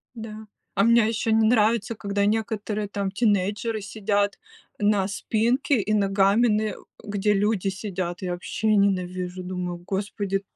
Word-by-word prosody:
Да. 220 -1 -8 0.3
А 200 - +3
мне 230 -1 +5
ещё 225 0 -1
не 220 0 +4
нравится, 225 -1 +2
когда 200 -1 -1
некоторые, 210 -1 -1
там, 200 -1 -2
тинейджеры 205 +1 0
сидят 205 0 -1 0.4
на 205 -2 +2
спинке, 235 +6 +1
и 210 +2 -1
ногами, 200 +2 +3
н 215 0 0 0.3
где 205 0 0
люди 205 -1 +1
сидят. 185 -3 -4
Я 185 - -2
вообще 175 +5 -4
ненавижу, 185 -2 0
думаю, 180 -1 -4
господи! 195 0 -2
205 Hz, 135 wpm, -25 LUFS, 195-220 Hz, 0.4 s, мне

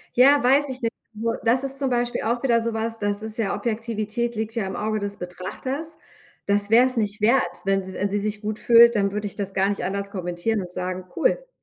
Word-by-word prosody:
Ja, 275 +3 +5
weiß 275 +3 +3
ich 255 -1 -4
nicht. 230 - -1 0.2
Nur, 230 +2 -3
das 250 +4 +4
ist 275 0 +5
zum 270 -2 0
Beispiel 240 0 -1
auch 235 +3 -2
wieder 235 -3 +2
so 230 0 0
was, 225 0 +1
das 205 0 +2
ist 220 +1 +1
ja 205 -3 -1
Objektivität 230 0 -3
liegt 220 +1 -4
ja 220 -5 -2
im 190 - -6
Auge 215 0 -2
des 205 0 -3
Betrachters. 260 - -5 0.5
Das 205 +1 +5
wär's 250 +2 +5
nicht 210 -2 -2
wert, 235 +5 +3 0.2
wenn 195 -1 0
sie 190 - -9
wenn 200 - -2
sie 205 +1 -1
sich 210 0 -3
gut 215 0 -4
fühlt, 235 0 +6
dann 200 -1 0
würde 210 0 -4
ich 200 - -4
das 200 -2 -1
gar 195 +1 +1
nicht 200 -3 -3
anders 200 +1 -2
kommentieren 185 +3 -3
und 180 0 -3
sagen: 185 0 -3
„Cool!“ - - -1
220 Hz, 230 wpm, -22 LUFS, 200-240 Hz, 0.5 s, fühlt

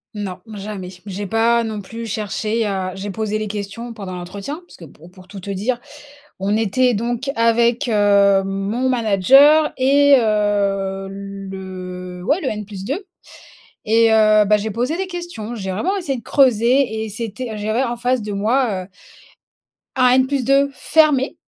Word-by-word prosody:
Non. 190 -3 -5 0.2
Jamais. 195 -2 -6 0.2
J'ai 200 0 -5
pas 230 +2 +2
non 215 -2 -4
plus 230 +4 -8
cherché 215 +1 -2
à 190 -2 -3
j'ai 195 +1 -5
posé 215 0 -2
les 215 - -3
questions 210 +3 -6
pendant 195 -4 -7
l'entretien 195 +10 -6
parce - - -16
que 170 - -12
po 155 +2 -16
pour 185 +1 -17
tout 200 0 -9
te 200 +2 -6
dire, 225 +6 -2 0.6
on 200 +2 0
était 235 +4 +2
donc 240 +5 -2
avec, 235 +1 +2
heu, 200 -2 +4
mon 195 +6 -2
manager 260 +7 +5
et 280 +2 +5
heu, 200 -3 0
le, 190 -2 -8
ouais 305 - +1
le 270 - -2
N+2 210 - -4 0.9
et 225 +1 +4
heu, 215 -1 +5
bah, 210 +1 +4
j'ai 215 +1 -3
posé 250 +9 -1
des 385 0 -2
questions, 345 - -6
j'ai 190 -4 -5
vraiment 345 - -1
essayé 280 -9 -3
de 230 - -12
creuser 245 -2 +2
et 220 - -6
c'était, 225 +1 -5
j'avais 215 +5 -1
en 240 -1 -3
face 245 +1 0
de 210 -1 -5
moi, 210 -1 0
heu - - -27 1.1
un 250 -1 +5 0.2
N+2 275 +1 +2
fermé. 290 -1 +2
215 Hz, 160 wpm, -19 LUFS, 195-250 Hz, 1.1 s, manager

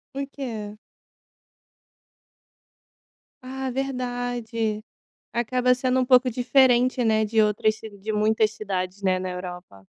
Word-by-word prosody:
O 275 0 -3
quê? 220 -6 -6 2.6
Ah, 265 +1 -5
verdade. 245 -4 -3 0.5
Acaba 250 +2 +2
sendo 255 0 +1
um - - +2
pouco 255 -1 +5
diferente, 250 0 +3
né, 220 -1 +3
de 220 +1 +2
outras 215 +1 +1
cid 215 -3 -11
de 215 +3 -4
muitas 215 +1 +2
cidades, 195 -2 -4
né, 185 -1 +2
na 185 0 -4
Europa. 180 - -8
225 Hz, 115 wpm, -24 LUFS, 210-250 Hz, 2.6 s, pouco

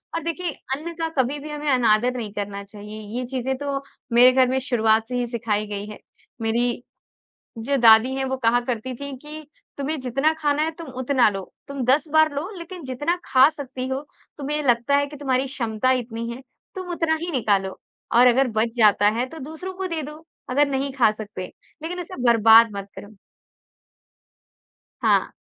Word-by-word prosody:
और 330 - -2
देखिए, 335 +1 -3 0.2
अन्न 325 +4 -7
का 325 0 -1
कभी 270 +4 -3
भी 300 +2 -8
हमें 295 0 -3
अनादर 245 0 +3
नहीं 220 -4 -5
करना 200 -1 -5
चाहिए। 210 +1 -10 0.2
ये 250 - -2
चीज़ें 260 +1 -2
तो 280 0 -3 0.3
मेरे 245 +2 +8
घर 255 0 +4
में 260 +1 +1
शुरुआत 225 -3 +2
से 250 - -4
ही 245 0 0
सिखाई 220 -3 -2
गई 205 0 -5
हैं। 210 - -9 0.4
मेरी 240 +2 0 0.8
जो 275 +5 0
दादी 230 +1 +6
हैं, 270 0 -1
वो 265 0 -2
कहा 240 -1 +2
करती 250 +1 -3
थीं 280 +1 -6
कि, 300 +2 -10 0.3
"तुम्हें 295 +3 -2
जितना 270 +5 +1
खाना 300 -1 0
है, 320 - 0
तुम 330 0 -10
उतना 260 -2 +3
लो। 195 -1 -5 0.3
तुम 280 -2 -4
10 280 +6 +3
बार 315 -1 +5
लो, 295 +6 -3
लेकिन 340 -1 -9
जितना 290 +7 -1
खा 265 +1 +6
सकती 265 -4 -6
हो, 265 +1 -2 0.4
तुम्हें 295 +1 -2
लगता 240 +2 +3
है 285 0 +2
कि 295 +1 -10
तुम्हारी 265 -2 0
क्षमता 245 -3 -1
इतनी 230 0 -6
है, 235 +2 -7 0.3
तुम 370 -2 -6
उतना 330 -2 +1
ही 345 +1 -3
निकालो 200 -7 0 0.3
और 245 +1 +6
अगर 250 +2 +4
बच 225 +1 +1
जाता 210 -2 +5
है, 250 - 0
तो 320 - -10
दूसरों 320 +7 -7
को 380 0 -4
दे 330 -3 -3
दो, 300 +3 -9 0.3
अगर 285 +3 +3
नहीं 275 0 -2
खा 255 -5 +4
सकते, 210 -3 -7 0.4
लेकिन 345 +3 -4
इसे 350 -6 -7
बर्बाद 230 0 +7
मत 200 0 -6
करो।" 210 +1 -12 1.9
हाँ। - - +2
260 Hz, 190 wpm, -23 LUFS, 230-295 Hz, 1.9 s, मेरे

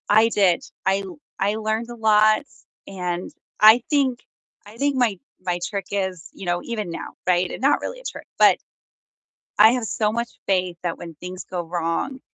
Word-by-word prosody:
I 220 +2 +6
did, 195 -6 +3 0.2
I 195 +1 +3
l 180 -4 -9 0.2
I 200 +2 +1
learned 220 +2 -2
a 240 - -7
lot, 215 +1 +4 0.4
and 180 -2 -4 0.3
I 220 +3 +8
think 270 -5 +2 0.5
I 210 +2 -13
think 285 +2 +1
my 235 -7 +1 0.2
my 180 -1 -2
trick 200 -2 -4
is, 190 -4 -3
you 195 - -9
know, 175 0 0
even 215 -5 -4
now, - - -6
right? 180 0 +3
And - - -7
not 280 +2 +3
really - - -5
a - - -16
trick, - - -7
but - - +6 1.0
I 220 +2 +8
have 250 -2 -1
so 215 -1 0
much 235 +1 -2 0.2
faith 185 -2 +1
that 175 -2 -2
when 170 -1 -9
things 180 +4 -8
go 180 -1 -4
wrong, 170 +10 -2
205 Hz, 185 wpm, -23 LUFS, 180-230 Hz, 1.0 s, I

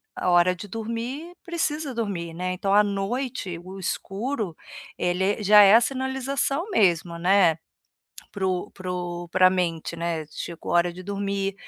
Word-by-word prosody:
a - - -1
hora 175 +1 +4
de 185 +4 -9
dormir 235 - -5
precisa 315 -5 -2
dormir, 190 -7 -3
né, 185 +1 -2
então 195 +2 -2
à 210 +1 +6
noite 200 -1 -3
o 190 +2 -9
escuro, 200 - -3 0.4
ele 180 +1 0 0.2
é 210 - -5
já 210 +1 +8
é 200 0 +7
a 230 - +7
sinalização 270 - -1
mesmo, 175 - +2
né, 180 -2 +4 0.7
para 195 -2 -2
o 185 +2 -2
para 185 -1 -7
o 175 -1 -4
pra 185 +1 +5
a - - -2
mente, 170 -3 -1
né, 170 -1 -2
chegou 170 +2 -6
hora 175 0 +3
de 180 +2 -10
dormir, 200 0 -2
195 Hz, 165 wpm, -25 LUFS, 175-230 Hz, 0.7 s, já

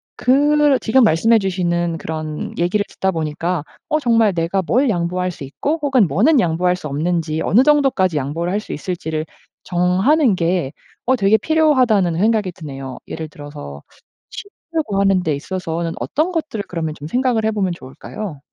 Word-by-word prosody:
그 290 +2 +3
지금 250 +3 +3
말씀해 225 +4 +4
주시는 175 -3 -1
그런 155 -1 -5
얘기를 180 +4 +1
듣다 190 - -2
보니까 165 0 -2 0.3
'어 305 0 +2
정말 230 -6 +3
내가 170 +3 0
뭘 250 +9 +1
양보할 180 0 -1
수 145 - -10
있고 285 - -2
혹은 265 -8 +3
뭐는 245 - +3
양보할 180 -1 +1
수 170 -4 -7
없는지, 160 +2 -1
어느 225 +9 +4
정도까지 265 - +3
양보를 155 +6 -2
할 205 - +1
수 215 - -7
있을지를 160 -1 -4 0.4
정하는 190 - +2
게 170 -4 0 0.4
어 260 - +4
되게 215 -1 +4
필요하다.'는 250 - +2
생각이 215 -2 +2
드네요. 135 -6 -8
예를 160 -1 -5
들어서 75 - -9 0.9
합치려고 255 -12 0
하는 195 -2 +3
데 155 - 0
있어서는 165 +1 -4
어떤 320 +5 -1
것들을 310 -11 -3
그러면 160 -3 -3
좀 150 - -8
생각을 245 +2 +1
해 - - +3
보면 195 -4 -1
좋을까요? 165 +4 -8
185 Hz, 355 characters per minute, -19 LUFS, 165-230 Hz, 0.9 s, 말씀해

